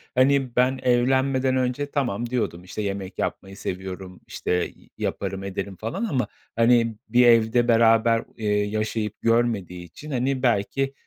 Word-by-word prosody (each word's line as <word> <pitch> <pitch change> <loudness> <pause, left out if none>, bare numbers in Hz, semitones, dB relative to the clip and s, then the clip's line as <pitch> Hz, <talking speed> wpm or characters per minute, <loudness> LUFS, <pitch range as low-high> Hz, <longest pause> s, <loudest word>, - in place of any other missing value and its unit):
hani, 130 -1 +3
ben 130 +1 +2
evlenmeden 130 +1 +2
önce 130 +3 -1
tamam, 120 -5 -1
diyordum. 110 -8 -2
İşte, 95 +3 -6
yemek 100 -2 -4
yapmayı 95 0 -4
seviyorum, 95 -1 -6
işte, 90 0 -1
i - - -22
yaparım 95 0 -3
ederim 100 0 -5
falan 115 - -3
ama. 130 - -1 0.3
Hani, 115 -1 +3
bir 120 +2 +5
evde 115 +1 +4
beraber 115 0 +4
u - - -13
eee, 110 -2 -3 0.2
yaşayıp 110 0 -3
görmediği 115 -7 0
için, 150 - -11
hani, 130 0 -1
belki, 130 +4 +1
115 Hz, 145 wpm, -24 LUFS, 100-130 Hz, 0.3 s, bir